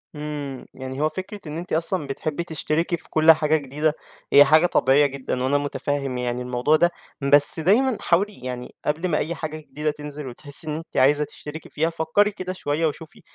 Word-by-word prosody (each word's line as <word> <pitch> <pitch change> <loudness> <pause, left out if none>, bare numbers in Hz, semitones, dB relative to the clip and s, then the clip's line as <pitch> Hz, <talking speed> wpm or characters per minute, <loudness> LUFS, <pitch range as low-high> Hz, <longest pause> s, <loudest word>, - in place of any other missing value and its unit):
إمم، 145 -3 -6
يعني 130 +1 -6
هو 155 - +2
فكرة 190 +6 -7
إن 150 +1 -5
أنتِ 175 +2 -6
أصلًا 165 -1 -1
بتحبي 155 +4 -3
تشتركي 165 +1 -2
في 175 - -12
كُل 160 +1 +6
حاجة 155 0 +2
جديدة 150 +2 -1 0.4
هي 145 - +9
حاجة 155 +2 +5
طبيعية 145 -3 +4
جدًا، 130 -2 -3
وأنا 140 +2 +2
متفهم 140 -2 -3
يعني 125 0 -2
الموضوع 125 +4 +1
ده، 175 +2 +3 0.3
بس 145 +3 +6
دايمًا 220 +9 +3
حاولي 195 -2 0
يعني 125 -1 -6
قبل 160 +5 0
ما 155 -4 +1
أي 170 +3 -2
حاجة 155 -1 -5
جديدة 150 0 -3
تنزل 150 -1 -8
وتحسي 145 +5 -3
إن 150 - -2
أنتِ 160 +2 -8
عايزة 145 +3 +4
تشتركي 150 +1 -9
فيها 160 +2 0
فكّري 165 +6 +1
كده 185 -1 -5
شوية 155 -2 -1
وشوفي 155 +1 -8
150 Hz, 190 wpm, -23 LUFS, 140-165 Hz, 0.4 s, هي